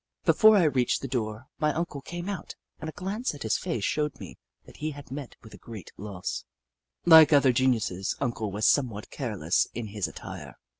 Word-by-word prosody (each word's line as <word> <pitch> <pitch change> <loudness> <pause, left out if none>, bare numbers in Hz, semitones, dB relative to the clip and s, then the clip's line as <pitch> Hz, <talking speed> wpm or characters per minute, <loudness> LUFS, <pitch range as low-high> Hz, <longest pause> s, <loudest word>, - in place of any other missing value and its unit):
Before 220 -1 +6
I 185 - +5
reached 135 -6 +1
the - - -2
door, 110 -2 -3
my 150 -1 +2
Uncle 165 -4 -3
came 175 +5 -6
out, 195 -5 -5 0.2
and 160 - -5
a - - -8
glance 200 +1 -3
at 145 - -8
his 110 - +1
face 115 - -3
showed 150 +1 -1
me - - -10 0.3
that - - -15
he 155 - -2
had 140 -2 -11
met 140 -2 -7
with 110 - -13
a - - -12
sfreat 110 -7 -10
loss. 95 -11 -5 0.6
Like 160 -3 +9
other 140 -3 +5
geniuses. 115 -7 +1
Uncle 115 -6 -2
was 105 +2 -1
somewhat 115 -7 +1
careless 105 - 0
in 115 -2 -4
his 100 -3 -2
attire. - - -9
130 Hz, 195 wpm, -27 LUFS, 110-150 Hz, 0.6 s, Like